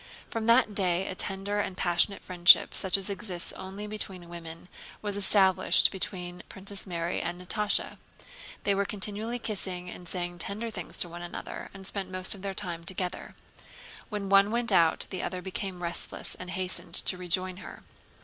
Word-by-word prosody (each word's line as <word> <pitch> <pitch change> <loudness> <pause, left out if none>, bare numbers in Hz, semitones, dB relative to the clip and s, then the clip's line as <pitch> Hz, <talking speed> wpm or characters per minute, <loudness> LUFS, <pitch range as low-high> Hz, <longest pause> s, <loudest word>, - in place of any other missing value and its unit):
From 225 -1 -2
that 230 -2 +5
day 185 -2 +1
a - - -3
tender 195 +2 0
and 190 -2 -2
passionate 175 +3 +2
friendship 175 -1 +6
such 190 +1 +3
as 195 - -2
exists 190 -3 -1
only 195 +2 -7
between 195 -4 -6
women 165 0 -9 0.4
was 205 -1 +2
established 195 -1 +5
between 180 -2 -3
Princess 195 +1 -5
Mary 170 -1 -2
and 175 - -4
Natásha. 210 +3 0 0.6
They 200 - +2
were 200 0 +1
continually 210 +4 -2
kissing 185 -6 -3
and 175 - -10
saying 175 -1 -3
tender 215 +6 -3
things 180 -5 -6
to - - +2
one 170 +1 -8
another 175 - -7
and 195 0 -11
spent 195 -1 -3
most 185 0 +2
of 200 - -8
their 195 -1 -4
time 175 -4 -4
together. 180 +1 -4 0.7
When 205 -3 -3
one 195 +1 +6
went 235 +1 +3
out 165 -1 +4
the 185 - -3
other 185 - -3
became 185 -1 -5
restless 170 0 0
and 180 - -7
hastened 185 0 -3
to - - +1
rejoin 180 +1 0
her. - - -10
190 Hz, 170 wpm, -29 LUFS, 180-200 Hz, 0.7 s, friendship